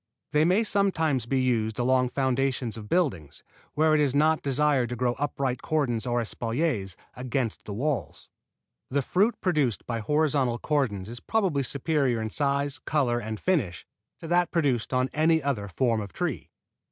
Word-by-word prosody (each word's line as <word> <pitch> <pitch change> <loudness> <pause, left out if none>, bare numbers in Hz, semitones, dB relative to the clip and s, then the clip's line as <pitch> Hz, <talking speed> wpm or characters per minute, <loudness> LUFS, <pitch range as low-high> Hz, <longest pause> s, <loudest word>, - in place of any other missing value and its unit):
They 150 +1 +3
may 185 +6 +3
sometimes 160 - +1
be 135 +1 +1
used 115 -4 0
along 125 +1 +2
foundations 130 -3 0
of 105 -2 -9
buildings, 125 - -1 0.3
where 155 +1 +3
it 155 - +4
is 140 -2 +1
not 155 +2 +3
desired 140 -2 +1
to 120 - -3
grow 120 0 0
upright 135 -3 -1
cordons 130 -7 -1
or 120 0 +1
espaliers 115 - -2 0.2
against 125 -2 -3
the 105 - -5
walls. 140 +3 -3 0.6
The 140 +1 0
fruit 205 - +1
produced 150 - 0
by 115 -1 -3
horizontal 140 0 +1
cordons 120 -10 -1
is 120 +2 -7
probably 190 - 0
superior 140 -2 0
in 110 0 -3
size, 140 0 0
color 130 -7 0
and 110 -2 -5
finish 140 - -1 0.3
to - - -11
that 175 +1 +2
produced 140 -9 0
on 130 0 +2
any 160 0 +3
other 120 -8 -1
form 115 +3 0
of 100 -5 -8
tree. - - -3
135 Hz, 165 wpm, -27 LUFS, 120-150 Hz, 0.6 s, it